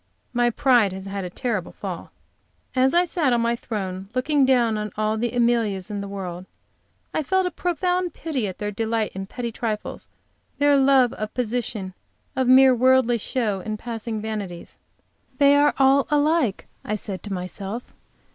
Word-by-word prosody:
My 240 0 +3
pride 240 -5 +3
has 190 0 -7
had 195 0 -4
a - - -4
terrible 215 -2 -3
fall. - - -6 0.7
As 260 +4 +3
I 350 +1 +5
sat 315 -7 +1
on 235 - +2
my 235 0 +1
throne, 195 -5 -5
looking 275 +1 +2
down 240 -4 +3
on 210 -1 -3
all 215 0 +1
the 235 +2 -1
Amelias 230 -5 +1
in 205 -1 -3
the 200 - -5
world, 185 -2 -6 0.7
I - - +1
felt 375 +5 +1
a 360 - -1
profound 360 +1 -1
pity 275 -10 -2
at 185 - -6
their 210 0 -3
delight 225 +1 -1
in 195 0 -6
petty 235 +2 -4
trifles, 220 -2 -4 0.5
their 285 0 +4
love 265 -3 +4
of 215 0 -6
position, 225 -5 -2 0.4
of 260 -1 +1
mere 260 +1 +7
worldly 250 -1 +3
show 215 -4 -1
and 215 +3 -4
passing 225 -1 -4
vanities. 210 -5 -6 0.6
"They 285 -1 +6
are 290 0 +4
all 270 0 +4
alike," 295 - +1 0.2
I 210 - -2
said 195 -3 -5
to 205 - -6
myself. 195 +5 -6
235 Hz, 170 wpm, -23 LUFS, 205-265 Hz, 0.7 s, mere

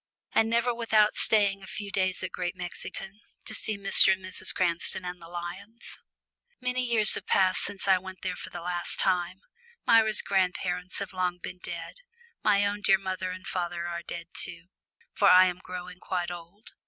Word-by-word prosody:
And 225 - +3
never 235 +1 +2
without 220 -2 +3
staying 200 -3 +3
a 190 - -11
few 205 0 -6
days 185 -1 -1
at 185 - -4
Great 180 0 -3
Mexington, 190 +2 -6 0.3
to - - -7
see 215 -2 -1
Mr. 195 -1 +7
and 190 0 -7
Mrs. 185 - +2
Cranston 175 +1 -1
and 180 0 -6
the 165 - -11
lions! 180 +6 -8 0.6
Many 250 0 -1
years 230 -4 +5
have - - -3
passed 185 -1 +3
since 200 -1 -4
I 190 -1 +5
went 190 0 -11
there 185 -1 -2
for - - -9
the 175 - -8
last 175 0 -2
time. 185 0 +1 0.4
Myra's 220 -2 +4
grandparents 180 -1 -1
have 200 -1 -5
long 180 -1 -1
been 180 +1 -8
dead 170 - -7 0.5
my 205 -1 +3
own 205 0 -2
dear 195 -2 +4
father 185 -1 -4
and 185 +1 -7
mother 175 -1 -3
are 170 0 -4
dead 170 0 -7
too, 170 0 -4 0.4
for - - +4
I 185 +1 +8
am 180 -1 -2
growing 180 0 -8
quite 175 -2 -3
old. 175 +5 -11
185 Hz, 185 wpm, -28 LUFS, 180-200 Hz, 0.6 s, I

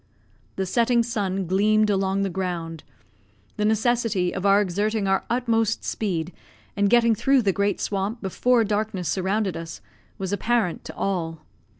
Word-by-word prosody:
The 190 - -1
setting 235 +4 +2
sun 195 -5 -2
gleamed 210 +4 +3
along 195 0 0
the 195 - -1
ground; 170 -4 -4 0.7
the 210 - 0
necessity 220 -4 +1
of 190 +1 -1
exerting 205 +1 +2
our 190 0 +1
utmost 230 -2 0
speed, 180 -5 -2 0.4
and 205 -1 +2
getting 235 0 +4
through 265 +4 +2
the 195 -2 +2
great 200 +1 0
swamp 200 +3 -2
before 230 +5 +2
darkness 205 -4 -2
surrounded 190 +1 0
us, 165 0 -7 0.4
was 190 0 -3
apparent 215 -3 0
to - - -8
all. 165 -5 -2
200 Hz, 140 wpm, -24 LUFS, 190-220 Hz, 0.7 s, getting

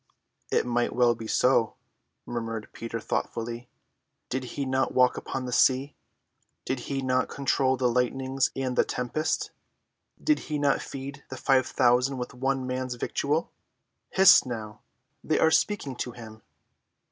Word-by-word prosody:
"It - - +2
might 120 0 0
well 120 -1 +4
be 115 -1 -8
so," 120 -1 +2 0.5
murmured 115 -2 -4
Peter 115 0 -5
thoughtfully. 115 +2 -4 0.6
"Did 130 0 -2
he 140 - -1
not 130 0 0
walk 125 -1 +4
upon 130 -1 -4
the 125 - -4
sea? 130 +2 +3 0.7
Did 130 - -2
he 135 -1 -2
not 130 0 +1
control 135 -1 +1
the 125 0 +2
lightnings 130 +2 0
and 130 -2 -2
the - - +4
tempest? 125 +6 -2 0.7
Did 305 -1 +2
he 150 - 0
not 145 -1 +2
feed 140 +1 -7
the - - -6
five 130 -2 +3
thousand 125 +1 +2
with 125 -1 -5
one 135 +1 -1
man's 130 0 -3
victual? 145 +6 -1 0.6
Hist 190 -1 +7
now, 110 -3 -6 0.4
they 155 - +1
are 160 - +4
speaking 160 -9 +1
to 125 - -4
him!" 110 -2 -11
130 Hz, 145 wpm, -27 LUFS, 120-135 Hz, 0.7 s, Hist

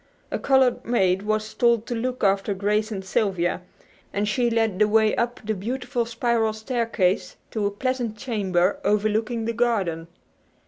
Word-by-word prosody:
A - - -1
colored 265 -2 +3
maid 190 -5 +2
was 215 +1 -2
told 235 -2 +2
to 245 - -4
look 250 +1 -3
after 195 0 +2
Grace 210 +3 0
and 195 -2 -5
Sylvia, 185 -3 0 0.5
and 205 +1 -1
she 240 +3 +1
led 225 -4 0
the 210 - +5
way 220 0 +3
up 240 +1 -1
the 220 +1 -1
beautiful 240 +4 -3
spiral 230 -1 0
staircase 220 -5 -1 0.2
to 210 -2 0
a - - +1
pleasant 240 +1 -2
chamber 200 -7 0
overlooking 215 +2 0
the 230 - -1
garden. 200 -9 0
220 Hz, 155 wpm, -24 LUFS, 200-235 Hz, 0.5 s, the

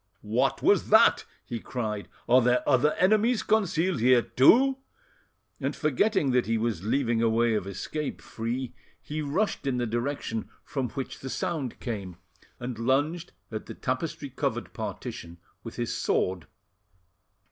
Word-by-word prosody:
"What - - +1
was - - +3
that?" - - +6 0.2
he 115 - -4
cried. 110 -4 -4 0.2
"Are 125 +2 +6
there 125 +1 +2
other 145 +2 +4
enemies 215 +5 +3
concealed 190 - +1
here 125 0 +5
too?" 265 - +5 0.8
And - - -2
forgetting 155 - +1
that 125 -2 +2
he 115 0 +1
was 110 -6 -1
leaving 115 0 +1
a 115 - +3
way 115 +1 +2
of 105 -3 -1
escape 145 +10 -4
free, 120 +3 -4 0.3
he 155 +1 -5
rushed 150 +2 -1
in 130 -2 0
the 120 - 0
direction 120 0 -3
from 130 -4 -3
which 135 +2 -6
the 135 - -6
sound 140 -3 -3
came, 100 -7 -5 0.4
and 120 -2 -5
lunged 145 +8 0 0.2
at 110 -1 -5
the - - -7
tapestry - - -3
covered - - -3
partition 85 0 -6 0.3
with - - -8
his - - -2
sword. 90 -4 0
125 Hz, 145 wpm, -27 LUFS, 115-150 Hz, 0.8 s, that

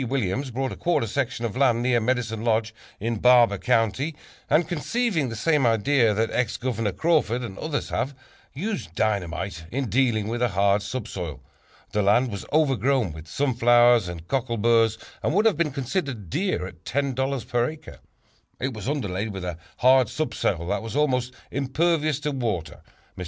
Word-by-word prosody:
Williams 130 +1 -1
bought 130 +2 -2
a - - -5
quarter 175 -9 +1
section 120 +1 -2
of 110 - -4
land 125 -3 +3
near 125 -1 +3
Medicine 115 -2 -1
Lodge 110 -1 +1 0.3
in 115 +1 -2
Barber 120 -5 +5
County, 125 +6 +1 0.3
and, 155 +2 +3
conceiving 175 - -1
the 115 - -5
same 150 +5 +2
idea 115 +1 +3
that 110 +1 0
Ex 125 -4 0
Governor 115 -4 -1
Crawford 135 - +1
and 105 -5 -6
others 155 -2 -3
have, 135 +3 -2 0.4
used 175 - -4
dynamite 95 -4 -2
in 130 -4 -3
dealing 115 -4 +2
with 120 +2 -3
a 125 - +4
hard 100 +1 +2
subsoil. 100 - -5 0.5
The 105 - +1
land 110 +5 +3
was 100 -2 -6
overgrown 135 - +2
with 80 0 -10
sunflowers 120 - +4
and 85 -1 -7
cockleburs 115 -3 +2 0.2
and 155 - 0
would 210 +3 +3
have 225 - +4
been 170 -2 +1
considered 130 - -3
dear 185 - -1
at 90 -2 -11
$10 135 0 -1
per 120 0 +1
acre. 155 0 -11 0.6
It 130 +1 -2
was 110 +4 -5
underlaid 105 -7 -2
with 95 -2 -6
a 85 -2 -5 0.2
hard 130 -2 +5
subsoil 100 - -1
that 100 - 0
was 115 +2 -6
almost 130 -4 +1 0.2
impervious 155 +2 +1
to 150 +1 -1
water. 115 - -3 0.3
Mr. - - -12
120 Hz, 170 wpm, -25 LUFS, 105-140 Hz, 0.6 s, Barber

